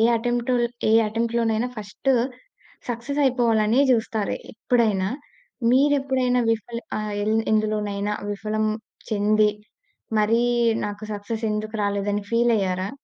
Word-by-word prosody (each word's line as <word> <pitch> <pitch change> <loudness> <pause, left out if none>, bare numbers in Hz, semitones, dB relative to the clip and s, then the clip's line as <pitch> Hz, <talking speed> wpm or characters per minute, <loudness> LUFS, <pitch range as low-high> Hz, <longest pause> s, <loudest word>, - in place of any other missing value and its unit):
Attempt 240 +1 0 0.4
ఏ - - +4
యటెంప్ట్‌‌‌‌‌‌‌లోనైనా 230 +1 0
first 210 +5 -3 0.8
success 245 +5 -2
అయిపోవాలనే 235 -2 +3
జూస్తారు, 220 -3 0 0.2
ఎప్పుడైనా. 220 -4 +1 0.6
మీరెప్పుడైనా 265 -2 +2
విఫల 225 +1 -2 0.2
ఆహ్, 215 -1 -3
ఎల్ 215 +1 +1 0.2
ఎందులోనైనా 210 -1 0 0.2
విఫలం 215 +1 -2 0.5
చెంది, 210 0 +3 0.7
మరీ 225 +3 +3 0.4
నాకు 205 +1 -6
సక్సెస్ 215 +2 -4
ఎందుకు 215 +1 -4
రాలేదని 205 0 -1
ఫీలయ్యారా? 205 -6 +1
220 Hz, 95 wpm, -23 LUFS, 210-235 Hz, 0.8 s, ఏ